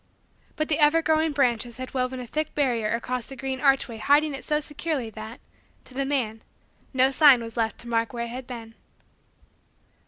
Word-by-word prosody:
But 310 - -1
the 305 - +1
ever 310 +2 +5
growing 315 0 +2
branches 240 -4 0
had 255 0 -7
woven 255 0 -1
a 250 - -6
thick 310 +5 -3
barrier 240 -7 +1
across 250 +1 -3
the 270 - -9
green 265 +1 -4
archway 270 -5 +2
hiding 290 +5 +3
it 270 -2 -6
so 300 +3 +1
securely 295 -5 -3
that, 220 +3 -9 0.5
to - - -14
the 275 +1 -1
man, 240 -6 -1 0.5
no 260 0 +3
sign 275 -2 +7
was 230 -1 -8
left 225 -2 -1
to 235 - -10
mark 230 -1 0
where 235 -1 -3
it - - -7
had 250 +1 -7
been. 230 -3 -8
255 Hz, 190 wpm, -25 LUFS, 235-290 Hz, 0.5 s, sign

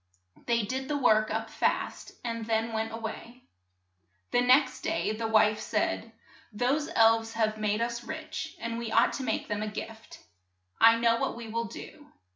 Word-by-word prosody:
They 235 -1 +2
did 260 +5 -3
the 295 - -1
work 215 -5 +3
up 220 +1 -2
fast, - - -1
and 230 -1 -3
then 225 0 0
went 220 0 -2
a 225 - -5
way. 230 +2 -7 0.9
The 245 - +3
next 255 +2 +4
day 330 -8 -1
the 225 +1 -3
wife 215 -1 +4
said, - - -1 0.4
"Those 255 +7 0
elves 225 0 +4
have 215 -1 0
made 210 +1 0
us 235 0 -3
rich, 315 +2 -6
and 230 0 -4
we 230 -2 -4
ought 230 +2 +4
to 270 - -4
make 225 -3 -2
them 210 0 -2
a 215 - -2
|\V 210 - -7
gift. 225 0 -11 0.6
I 230 0 +7
know 230 0 +3
what - - -2
we 235 0 -8
^ - - -8
will 230 +1 -1
do. 295 +5 -10
230 Hz, 190 wpm, -29 LUFS, 220-245 Hz, 0.9 s, I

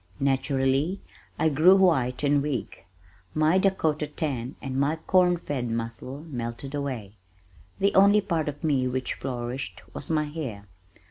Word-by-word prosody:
Naturally 135 +5 +1 0.4
I 160 - +3
grew 160 +6 +6
white 140 -10 +2
and 145 0 +3
weak. 140 - -4 0.5
My 155 +4 +4
Dakota 160 -6 +1
tan 140 -5 -3
and 135 -1 -5
my 140 +3 +2
corn 180 +2 +3
fed 135 -7 -3
muscle 115 +4 -4
melted 120 0 -5
away. 125 -8 -4 0.6
The 200 +1 +2
only 200 +2 +6
part 165 -6 -1
of 145 0 -9
me 135 -5 +2
which 130 0 -2
flourished 125 0 -5
was - - -4
my 155 -2 +2
hair. 140 -10 -6
145 Hz, 140 wpm, -26 LUFS, 130-160 Hz, 0.6 s, grew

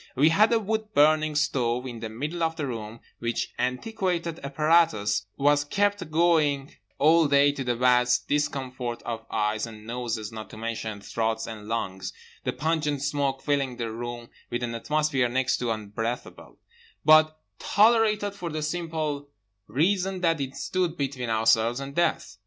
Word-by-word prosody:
We 145 +4 +5
had 210 +7 +4
a 230 - +5
wood 220 0 -3
burning 155 +1 +4
stove 125 -4 0
in 120 -3 -6
the 110 0 -5
middle 150 +10 -4
of 165 0 +1
the 150 - -3
room, 115 -3 -6 0.2
which 115 0 -2
antiquated 170 - -2
apparatus 140 -9 +2
was 145 +1 +3
kept 205 +3 0
going 155 -4 +2 0.2
all 160 +2 +5
day 140 0 +5
to 140 -1 -5
the 120 -1 0
vast 125 0 +3
discomfort 130 -5 -2
of 115 -1 -5
eyes 110 +1 0
and 110 -1 -11
noses 115 -2 -4
not 110 -1 -8
to - - -11
mention 110 -2 -4
throats 110 +1 -2
and 110 -2 -8
lungs—the 95 -4 -5
pungent 150 -1 -1
smoke 140 -2 -1
filling 140 -4 0
the 115 -2 -3
room 120 +1 -6 0.2
with 120 0 -3
an 120 -1 -2
atmosphere 140 +1 0
next 130 +1 +1
to 120 - -2
unbreathable, 115 +2 -5 0.5
but 155 0 +6 0.2
tolerated 215 -2 +3
for 180 -4 -5
the 155 -1 -3
simple 155 -3 -3 0.4
reason 185 - +1
that 165 -4 +2
it 135 0 -4
stood 175 +4 -1
between 135 -4 -3
ourselves 110 +2 +3
and 140 0 -6
death. 165 -10 0
140 Hz, 155 wpm, -26 LUFS, 115-160 Hz, 0.5 s, but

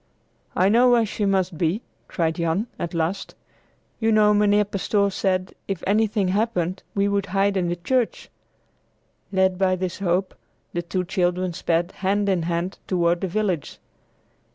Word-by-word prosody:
"I 185 - +4
know 240 +5 +5
where 235 -2 +4
she 210 0 -2
must 190 -4 0
be," 175 +7 0 0.2
cried 165 -2 0
Jan, 170 +5 0
at 170 0 -4
last. 170 +4 -2 0.6
"You 225 -1 +2
know 210 -1 +5
Mynheer 210 0 +3
Pastoor 200 0 0
said, 185 -1 -1
if 195 -3 -4
anything 205 -1 +2
happened, 190 -3 0
we 200 0 +2
should 200 -1 0
hide 195 +2 +1
in 180 -2 +1
the 175 - -1
church." 235 +7 -1 1.0
Led 190 -1 +2
by 185 -1 +3
this 185 0 -4
hope, 185 0 0 0.4
the 175 - -1
two 180 +2 -2
children 180 -1 0
sped, 170 0 0
hand 200 +1 +1
in 185 -3 +2
hand, 170 +3 -2
toward 175 -2 +1
the 190 - 0
village. 185 -4 -2
190 Hz, 155 wpm, -23 LUFS, 175-205 Hz, 1.0 s, know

